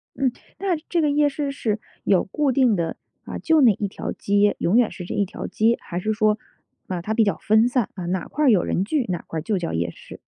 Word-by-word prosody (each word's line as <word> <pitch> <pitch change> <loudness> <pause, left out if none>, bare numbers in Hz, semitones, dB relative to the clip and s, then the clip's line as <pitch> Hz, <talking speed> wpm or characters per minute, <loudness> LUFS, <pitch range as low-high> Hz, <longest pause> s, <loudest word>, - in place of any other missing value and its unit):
嗯， 265 -3 +1 0.3
那 380 -3 +1
这 340 -2 +2
个 300 - +2
夜 295 0 +3
市 280 0 -3
是 220 -5 -2 0.2
有 190 -3 +3
固 280 +7 0
定 250 -4 +3
的， 170 -2 -2 0.3
啊， - - -5
就 320 -2 +3
那 230 -5 +6
一 200 +1 -3
条 - - -5
街， 205 0 +2
永 195 +8 +2
远 240 -3 +3
是 180 - -8
这 - - -5
一 200 - +1
条 - - -7
街。 230 +2 +2
还 175 - -5
是 215 +3 -1
说， 215 -1 +2 0.5
啊， 180 -2 -3
它 215 +5 -2
比 225 - +4
较 200 - 0
分 220 +2 +3
散， 250 -4 0
啊， 180 -3 -6
哪 180 -1 -2
块 300 +1 -1
儿 - - +6
有 195 -6 +4
人 185 - 0
聚， 270 +3 0
哪 175 - -2
块 160 - -3
儿 - - -4
就 205 +3 -1
叫 170 -2 -3
夜 85 +1 -1
市。 - - -13
215 Hz, 275 characters per minute, -23 LUFS, 190-265 Hz, 0.5 s, 那